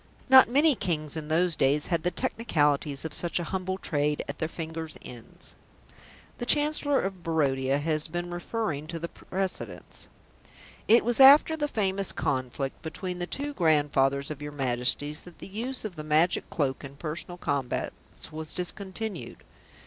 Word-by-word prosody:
Not 260 -2 +8
many 290 +5 +4
Kings 155 - -1
in 155 -1 -5
those 165 +2 +2
days 145 +2 +2
had 165 - +1
the 180 - +1
technicalities 150 - 0
of 160 - -5
such 175 0 -1
a - - -2
humble 185 +2 -3
trade 150 -4 -1
at 140 - -6
their 160 - -1
fingers' 160 -1 -6
ends. 120 -2 -11 0.9
The 240 - -3
Chancellor 295 -1 +4
of 190 -2 -4
Barodia 140 -5 +1
has 155 +1 0
been 175 +2 -4
referring 175 -4 -3
to 165 +1 -5
the 170 +1 -5
precedents. 190 0 -5 0.8
"It 225 0 +5
was 240 +1 +1
after 285 +4 +8
the 295 -2 -1
famous 195 -6 0
conflict 130 +1 -3
between 180 +2 -5
the 175 - -3
two 290 +6 -3
grandfathers 145 - +2
of 145 -1 -7
your 145 0 -6
Majesties 135 +3 0
that 175 -2 -14
the - - -10
use 230 +6 -2
of 200 -5 -5
the 155 - -6
Magic 155 +3 +2
Cloak 135 -4 -1
in 140 0 -9
personal 165 +4 -4
combats 140 0 -4
was 155 0 -5
discontinued." 190 - -5
165 Hz, 160 wpm, -27 LUFS, 145-195 Hz, 0.9 s, Not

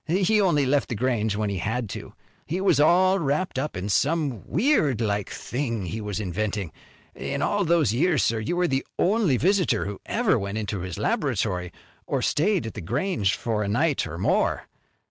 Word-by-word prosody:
He 195 +5 +3
only 160 -8 +3
left 140 +2 +1
The 120 - -2
Grange 110 -3 0
when 105 -1 -1
he 95 - -3
had 110 +6 -2
to. - - -7 0.3
He 170 +5 -2
was 190 -7 +3
all 185 +5 +4
wrapped 150 0 -1
up 145 -7 -3
in 90 +2 -3
some 140 - 0
weird 160 - +2
like 105 -3 -1
thing 115 -6 -3
he 110 +6 -4
was 105 -1 -3
inventing. 100 -1 -2 0.4
In 140 0 -3
all 205 0 +1
those 165 - +2
years, 155 +3 +2
sir, 115 -1 +1
you 110 +11 -2
were 180 0 +2
the 135 -3 0
only 190 - +2
visitor 180 - +2
who 100 0 -6
ever - - +2
went 100 +2 -4
into 105 -2 -3
his 90 -1 -5
laboratory, 90 -1 -1 0.4
or - - -1
stayed 180 - +1
at 110 - -5
The 105 - -6
Grange 120 - 0
for 110 -2 -2
a 105 - -1
night 140 - +1
or 80 +1 -7
more. 90 - +1
130 Hz, 190 wpm, -25 LUFS, 105-170 Hz, 0.4 s, all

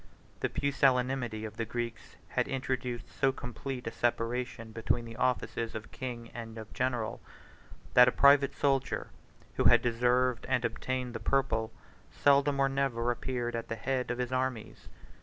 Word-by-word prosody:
The - - 0
pusillanimity 130 -5 +1
of 110 0 -8
the 115 - -1
Greeks 115 0 -5
had - - 0
introduced 130 -2 -3
so 135 - +1
complete 125 0 -6
a 115 - -3
separation 120 0 -2
between 115 +1 -1
the 115 -1 -9
offices 125 -2 -1
of 110 -1 -7
king 120 -3 -6
and 115 -1 -7
of 110 -1 -9
general, 125 -3 -1 0.7
that 125 0 +8
a - - +5
private 140 0 +5
soldier, 135 -2 0 0.5
who - - +1
had - - +6
deserved 125 +1 +2
and 125 -2 +2
obtained 125 +2 -2
the 115 - -4
purple, 115 -2 +1 0.4
seldom 140 0 +3
or 135 - +4
never 135 -3 0
appeared 120 -1 -3
at 115 - -4
the 115 - -3
head 125 +3 -2
of 125 - -1
his 125 0 -2
armies. 130 -3 -3
125 Hz, 160 wpm, -31 LUFS, 115-130 Hz, 0.7 s, that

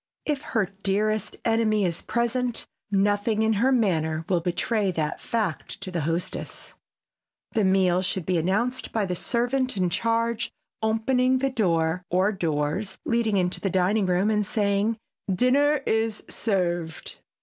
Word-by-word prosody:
If 295 -3 -1 0.2
her 210 - +3 0.2
dearest 210 +2 0
enemy 220 -3 +2
is 170 -1 -2
present 240 0 -1 0.3
nothing 205 +2 +2
in 220 0 +3
her 260 +2 +4
manner 165 -9 +1
will 180 -2 +2
betray 195 +4 0
that 155 -4 -2
fact 215 -5 -2
to 190 -1 -6
the 170 -2 -1
hostess. 165 +4 -3 0.8
The 220 - +1
meal 190 -1 +3
should 185 -2 -2
be 180 -2 +1
announced 215 +9 0
by 220 -3 0
the 180 -1 -2
servant 245 +4 0
in 180 -2 +1
charge 230 +2 0 0.3
opening 250 +4 +2
the 270 +1 0
door 170 -7 +1
or 185 +4 +2
doors 170 +2 -1
leading 230 -3 +1
into 180 -1 0
the 195 - 0
dining 190 +3 +2
room 185 +4 +2
and 210 -1 +2
saying, 205 +2 0 0.4
"Dinner 280 +5 +3
is 220 -1 0
served." 175 -6 -2
205 Hz, 145 wpm, -25 LUFS, 180-230 Hz, 0.8 s, her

